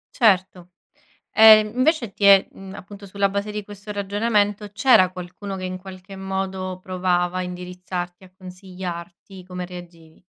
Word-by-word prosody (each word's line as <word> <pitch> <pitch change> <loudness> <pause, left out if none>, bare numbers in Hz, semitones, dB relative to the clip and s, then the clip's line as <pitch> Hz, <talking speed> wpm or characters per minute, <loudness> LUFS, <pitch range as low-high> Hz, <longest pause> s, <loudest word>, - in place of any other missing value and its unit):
Certo, 185 -5 +2 0.6
ehm, 215 -1 +7
invece 255 -4 +1
ti 200 - -7
è, 195 -1 +7
mhmm, 195 0 -11
appunto 200 +1 -11
sulla 200 0 0
base 200 +1 -3
di 210 0 -5
questo 205 +1 -10
ragionamento, 205 +1 0
c'era 205 -5 +5
qualcuno 185 +2 -7
che 185 - -7
in 185 0 -4
qualche 185 0 -11
modo 190 -1 -4
provava 180 -1 -1
a - - -1
indirizzarti, 180 0 -6
a 185 - -17
consigliarti? 185 0 -9
Come 180 -1 -6
reagivi? 170 -3 -12
190 Hz, 145 wpm, -22 LUFS, 180-205 Hz, 0.6 s, ehm